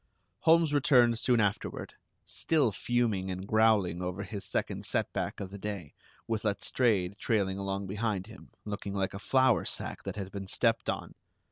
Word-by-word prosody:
Holmes 165 -2 +4
returned 125 -5 +4
soon 120 -1 +3
afterward, 105 -2 -1 0.3
still 150 -8 +1
fuming 110 -2 0
and 95 +1 -4
growling 105 -5 +3
over 90 +2 -3
his 100 0 -6
second - - -2
setback - - -2
of 95 -1 -6
the 100 - -8
day, 100 -7 -5 0.3
with 110 -1 -2
Letstrayed 105 -2 +1
trailing 100 -4 0
along 100 0 -2
behind 100 -1 -2
him, 110 - -13 0.2
looking 100 -1 -4
like 95 -1 -1
a 100 - -5
flour 130 -4 +3
sack - - -3
that - - -4
had 100 -2 -5
been 100 -1 -6
stepped 115 +3 +1
on! - - -3
105 Hz, 160 wpm, -30 LUFS, 95-115 Hz, 0.3 s, Holmes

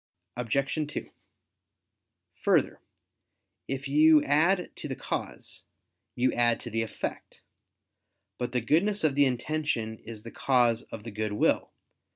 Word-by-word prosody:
Obj. 135 +5 -1
2: - - -6 1.2
Further, - - +1 0.9
if 135 +1 -3
you 150 +1 +6
add 170 +6 +2
to - - -6
the - - -4
cause, - - -5 0.5
you 125 +1 +2
add 120 -1 +3
to 120 - -7
the 115 +1 0
effect. 115 - -6 1.0
But 125 -1 -2
the 125 - 0
goodness 190 - +2
of 155 -3 +3
the 145 +1 +4
intention 125 -4 -2
is 110 -1 -10
the 115 - -9
cause 120 -3 +2
of 105 - -10
the 115 - -7
good 105 0 -3
will. 105 - +1
125 Hz, 135 wpm, -28 LUFS, 115-150 Hz, 1.2 s, you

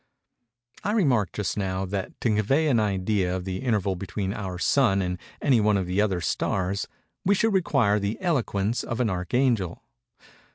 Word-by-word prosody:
I 205 - 0
remarked, 130 - +2
just 105 -1 -2
now, 95 -1 -1
that 95 0 -5
to 115 - +2
convey 135 +10 +2
an 120 -5 +3
idea 95 -2 0
of 90 -1 -4
the 95 -1 -3
interval 105 -6 0
between 95 +1 -3
our 95 -4 -5
Sun 105 +2 +3
and 90 -1 -2 0.2
any 125 -6 +4
one 105 -1 +3
of 95 - -1
the 90 +3 +1
other 95 -4 0
stars, 95 +3 -1 0.4
we 200 +2 +3
should 220 +2 +2
require 135 - +2
the 100 +2 -2
eloquence 120 - 0
of 120 - -4
an 115 -5 +1
archangel. 95 +1 0
105 Hz, 170 wpm, -26 LUFS, 95-120 Hz, 0.4 s, any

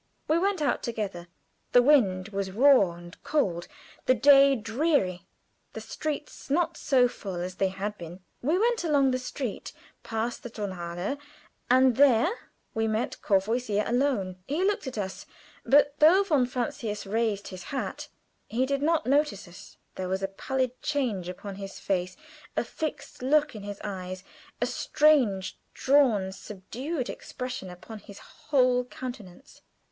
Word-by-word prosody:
We 320 +2 +3
went 380 -3 0
out 285 - +1
together. 200 -7 -4 0.5
The 245 - +8
wind 215 -9 +3
was 200 -2 -3
raw 225 -3 +5
and 175 0 -13
cold, 180 - 0 0.4
the 255 - +5
day 275 +3 +7
dreary, 225 - 0 0.5
the - - -5
streets 300 -2 -5
not 330 +3 +1
so 260 -5 +3
full 195 -5 -7
as 180 +1 -5
they 195 - +2
had 200 +2 -4
been. 170 +1 -8 0.2
We 305 +8 +2
went 465 +1 +1
along 285 -5 +3
the 255 - 0
street 255 -3 -5 0.3
past 225 +1 -3
the 240 - -7
Tonhalle, 185 +2 -4 0.5
and 255 -1 +5
there 275 - +5 0.4
we 225 0 0
met 230 +4 -2
Courvoisier 210 +1 +1
alone. 235 -7 0
He 305 +7 0
looked 400 -7 0
at 255 - -5
us, 190 -2 -5 0.4
but 285 +1 +4
though 345 +6 +7
von 295 -10 +2
Francius 230 -4 -3
raised 210 -1 -1
his 185 -2 -9
hat, 275 - -4 0.4
he 245 +4 0
did 275 +1 -1
not 320 +1 +2
notice 275 -8 +1
us. 175 +1 -14 0.2
There 185 -1 -3
was 190 +1 -1
a - - +1
pallid 255 +5 -3
change 240 -12 -1
upon 190 +2 -7
his 195 -1 -7
face, 185 -1 -2 0.4
a - - +2
fixed 310 -5 -6
look 295 +3 +2
in 210 - -7
his 205 0 -7
eyes, 185 -2 -5 0.4
a - - +1
strange, 245 -11 +2 0.2
drawn, 250 -9 +3
subdued 230 - -5
expression 250 -7 -6
upon 180 +5 -10
his 200 0 -13
whole 250 -3 +1
countenance. 245 -3 -9
235 Hz, 150 wpm, -27 LUFS, 195-280 Hz, 0.5 s, The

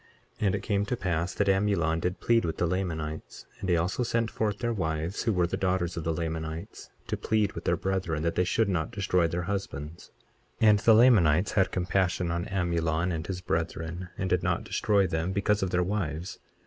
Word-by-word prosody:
23:33 - - 0
And 95 - +2
it - - -4
came 100 -2 +1
to 120 +4 -2
pass 90 -2 -1
that 105 - +1
Amulon 95 -5 +2
did 90 +2 -2
plead 115 -1 +3
with 80 - -2
the 90 - +1
Lamanites; 80 -4 -3
and 95 - -4
he 85 - +4
also 90 +8 -1
sent 115 -1 0
forth 105 -2 -1
their 120 +1 -1
wives, 80 -2 -2
who 115 - +1
were 90 -4 +2
the 85 - -2
daughters 90 -2 0
of 85 - -4
the 80 - 0
Lamanites, 80 0 -5 0.2
to - - -2
plead 110 -2 0
with - - -8
their - - +2
brethren, 95 -5 -1
that 85 0 0
they 90 - +2
should 110 +4 +1
not 85 -5 -1
destroy 90 -4 +1
their 85 +1 -2
husbands. 85 -5 -5 0.5
23:34 110 - +6
And 105 -1 +5
the 115 - +5
Lamanites 105 -8 +5
had 95 -3 +2
compassion 90 -1 0
on 85 +2 -2
Amulon 85 -3 0
and 80 -1 -4
his 90 -1 -4
brethren, 85 +1 -3
and 95 - -2
did 90 -1 +1
not - - 0
destroy 100 -2 +2
them, 85 +1 -1
because 100 +1 +1
of 95 - 0
their 90 0 +1
wives. 90 -3 -3
90 Hz, 210 wpm, -28 LUFS, 85-100 Hz, 0.5 s, 23:34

